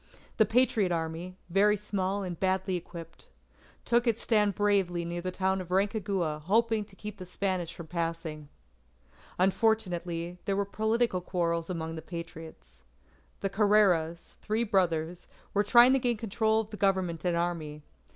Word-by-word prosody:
The 220 - +5
Patriot 225 -5 +3
Army, 165 +2 -3
very 205 +3 +4
small 200 -1 -2
and 180 -2 -5
badly 190 0 0
equipped, 170 - -9 0.6
took 240 +1 +2
its 230 -1 +2
stand 210 -4 +2
bravely 195 -4 +1
near 175 +1 -4
the 185 - -3
town 190 +1 0
of 180 - -9
Rancagua 190 -5 0
hoping 220 +2 +2
to 195 - -19
keep 210 +1 -8
the 185 - -8
Spanish 180 -2 -2
from 170 - -8
passing. 165 -3 -4 0.9
Unfortunately, 180 -4 0
there 195 - 0
were 200 - +1
political 220 -1 0
quarrels 170 -2 -1
among 165 -2 -3
the 160 - -6
Patriots. 165 - -9 0.6
The 195 - 0
Carreras 195 -6 +2
three 220 +2 0
brothers 175 -5 0 0.3
were 205 - +3
trying 240 +4 +7
to 270 - +3
gain 240 -2 0
control 220 0 +1
of 220 0 -11
the 210 - -7
Government 185 -5 0
and 175 -1 +1
Army. 160 -4 -3
185 Hz, 150 wpm, -29 LUFS, 170-210 Hz, 0.9 s, trying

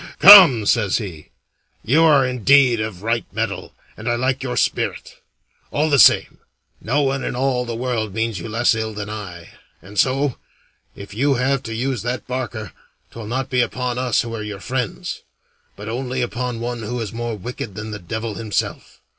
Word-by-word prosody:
"Come," 175 - +9
says 105 -3 +2
he, 90 -9 -7 0.6
"you 145 +9 +4
are 145 -4 +5
indeed 125 0 +3
of 110 -4 -5
right 115 +1 0
mettle, - - -4 0.2
and 110 +3 -5
I 120 - +1
like 130 +2 -1
your 130 -2 -4
spirit. - - -2 0.5
All 150 +1 0
the 140 - +4
same, - - +5 0.4
no 140 +8 0
one 135 -1 -1
in - - -3
all 125 -1 0
the 120 -1 -5
world 115 -3 -2
means 110 -1 -2
you 85 - -7
less 115 +3 +2
ill 110 -1 -4
than 105 0 -5
I, 90 -6 -8 0.3
and 95 +4 -7
so, 135 0 +1 0.6
if 100 0 -10
you 135 +5 +1
have 135 +2 0
to 115 -3 -6
use 125 0 -2
that 125 +2 -4
barker, 120 -4 -5 0.4
'twill 115 -2 -9
not 130 +3 -3
be 125 -1 +2
upon 125 0 -2
us 125 -2 +1
who 115 -1 -7
are 110 - -5
your 105 -2 -6
friends, 125 -1 -4 0.5
but 105 +1 -9
only 125 +2 -3
upon 120 0 -4
one 120 0 -4
who 120 +3 -4
is 110 -3 -5
more 120 -1 -4
wicked 110 -1 -7
than 110 +1 -6
the 105 - -6
devil 110 +4 -5
himself. 110 0 -4
120 Hz, 185 wpm, -20 LUFS, 110-130 Hz, 0.6 s, Come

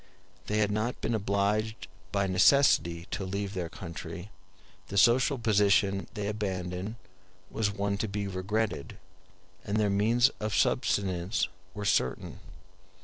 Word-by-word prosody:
They 105 - 0
had 105 -1 +2
not 110 +4 -1
been - - -1
obliged 105 +1 0 0.2
by 100 0 +1
necessity 95 -4 +4
to 100 - -3
leave 100 +1 -3
their 90 -4 -3
country; 85 +4 -8 0.6
the 100 - -4
social 125 +6 +4
position 100 -3 +2
they 105 -2 -3
abandoned 95 -1 -3 0.6
was 110 -1 0
one 100 0 -2
to 110 - -1
be 100 0 -3
regretted, 100 -2 -2 0.7
and 105 0 -1
their 105 -2 +2
means 115 +5 +4
of 110 -1 -2
subsistence 95 0 +1 0.3
were 105 -1 -4
certain. 65 -9 0
100 Hz, 130 wpm, -29 LUFS, 95-110 Hz, 0.7 s, necessity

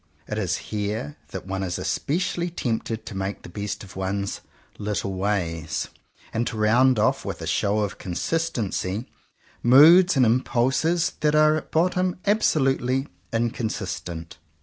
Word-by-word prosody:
It 105 - -3
is 90 -4 0 0.2
here 105 -8 -2
that - - -7
one 95 0 -3
is 90 -2 -2
especially 175 +2 -1
tempted 115 -7 -3
to 100 - -7
make 95 +1 -4
the - - -9
best 105 +3 -5
of 95 - -12
one's 100 +1 -2 0.4
"little 100 -2 -2
ways," 85 -6 -2 0.4
and 115 +1 0
to 110 - -4
round 120 +4 +4
ofl^, 110 - +2
with - - -5
a - - -5
show 105 +1 +1
of 100 -1 -3
consistency, 110 - -2 0.6
moods 160 +8 +7
and 130 - +5
impulses 130 +8 +2
that 150 0 +2
are 155 0 +5
at 155 - -3
the 160 - +3
bottom 180 +1 +1
ab 205 +2 +3
solutely 135 - +1 0.2
inconsistent. 95 -8 -3
110 Hz, 150 wpm, -24 LUFS, 95-150 Hz, 0.6 s, moods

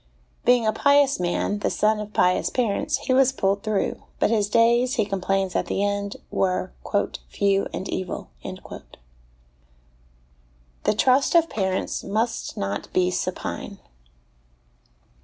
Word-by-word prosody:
Being 245 -1 +4
a 215 - +2
pious 280 +1 +3
man, 180 +3 -1
the - - 0
son 215 0 +1
of 210 0 -6
pious 180 -2 +2
parents, 230 -6 0
he 255 - +2
was 265 0 +5
pulled 200 -6 0
through, 215 -1 -1 0.2
but - - +2
his 210 -3 +1
days, 235 +3 +3
he 220 -5 +1
complains 195 -1 -1
at - - 0
the 200 - -1
end, 200 0 -2
were 185 -1 0 0.3
" - - -6
few 200 -1 +1
and 190 - -5
evil." 185 -1 -4
The - - -9 2.1
Trust 260 +8 +3
of 330 -1 +4
Parents 190 -3 -1
must 220 +4 -2
not 100 +1 -3
be 180 0 +2
Supine. - - -4
205 Hz, 135 wpm, -24 LUFS, 195-240 Hz, 2.1 s, was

